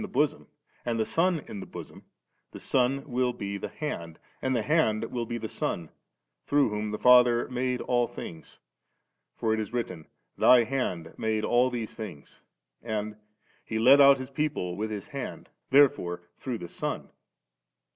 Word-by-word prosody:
the 210 - -4
bosom, 145 - 0 0.4
and 115 -1 -1
the 110 - +2
Son 165 +7 +2
in 100 - -7
the - - -7
bosom, - - -10 0.5
the - - -8
Son 135 +2 +1
will 125 -1 0
be 100 -2 -5
the 100 - -5
Hand, 85 - -5 0.2
and 130 0 0
the 115 - 0
Hand 115 -8 +2
will 120 -2 -3
be 120 0 -3
the 110 -1 -4
Son, 85 -6 -3 0.6
through 145 -4 +3
whom 105 0 -3
the 105 - -3
Father 125 -1 +6
made 125 0 -1
all 120 -1 +1
things; 80 -1 -9 0.8
for 110 -1 0
it 110 - 0
is 110 -1 -4
written, 115 -10 -4 0.3
*Thy 125 -1 +7
Hand 100 -10 -3
made 110 -1 0
all 125 +1 +3
these 120 -3 -4
things,' 95 -10 -9 0.4
and 110 -2 -3 0.2
' 105 - -36
He 110 - 0
led 130 +5 +7
out 140 0 +8
His 130 +1 -7
people 140 -12 -2
with 110 +3 -3
His 105 +6 -6
Hand*;' 140 -3 -6 0.2
therefore 135 -11 +3 0.2
through 125 -3 -3
the 85 - -7
Son. - - -4
120 Hz, 175 wpm, -28 LUFS, 105-130 Hz, 0.8 s, out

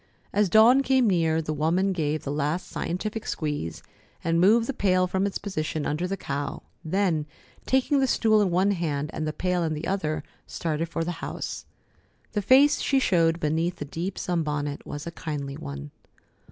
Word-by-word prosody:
As 205 -1 +3
Dawn 230 +7 +7
came 265 -2 +3
near, 165 -4 +2
the 155 - -2
woman 170 +6 +1
gave 155 -3 -1
the 140 - -3
last 150 +4 -1
scientific 215 +5 -4
squeeze, 145 - -3 0.4
and 165 0 +2
moved 225 +5 +5
the 275 - -2
pail 185 -5 +2
from 190 +2 0
its 200 - -3
position 155 -6 -3
under 155 +5 -1
the 195 +1 -3
cow, 140 -3 -4 0.2
then, 165 -3 0 0.4
taking 265 +2 +2
the 265 - +3
stool 220 -3 +3
in 200 - +2
one 185 +3 +2
hand 155 -5 -2
and 155 - -3
the - - 0
pail 180 +2 -1
in 160 -1 -1
the 150 - -5
other, 155 -6 -1 0.2
started 165 0 -2
for 165 - -2
the 175 0 -5
house. - - -5 0.6
The 210 - -1
face 270 +7 +5
she 275 - +2
showed 170 -8 +2
beneath 165 +3 0
the 145 - -6
deep 170 +6 -4
sunbonnet 150 -4 -2
was 145 0 -6
a 170 - -5
kindly 145 -4 -5
one. 70 - -7
170 Hz, 180 wpm, -26 LUFS, 155-195 Hz, 0.6 s, Dawn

